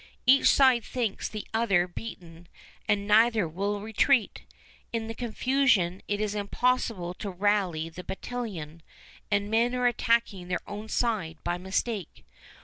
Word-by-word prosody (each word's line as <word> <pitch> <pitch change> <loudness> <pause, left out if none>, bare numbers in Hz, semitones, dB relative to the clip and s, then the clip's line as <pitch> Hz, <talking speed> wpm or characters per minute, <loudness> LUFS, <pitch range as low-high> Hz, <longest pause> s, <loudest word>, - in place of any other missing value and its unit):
Each 270 +2 +6
side 260 -4 +5
thinks 235 -6 -3
the 215 -1 -6
other 195 -6 +2
beaten, 175 -4 -9 0.4
and 205 -1 +1
neither 220 -2 +4
will 200 +5 -2
retreat. 225 +3 +2 0.5
In 230 -1 -2
the 225 - -5
confusion 235 -6 +1
it 205 0 -1
is 210 -1 -1
impossible 210 -3 0
to 200 +2 -6
rally 185 -4 0
the 170 +2 -9
battalions, 190 -7 -6 0.5
and 205 0 0
men 235 +3 +2
are 250 0 0
attacking 230 -6 +1
their 180 -1 -3
own 210 +2 -7
side 200 -9 -1
by 175 0 -2
mistake. 190 +1 -3
210 Hz, 140 wpm, -28 LUFS, 180-235 Hz, 0.5 s, Each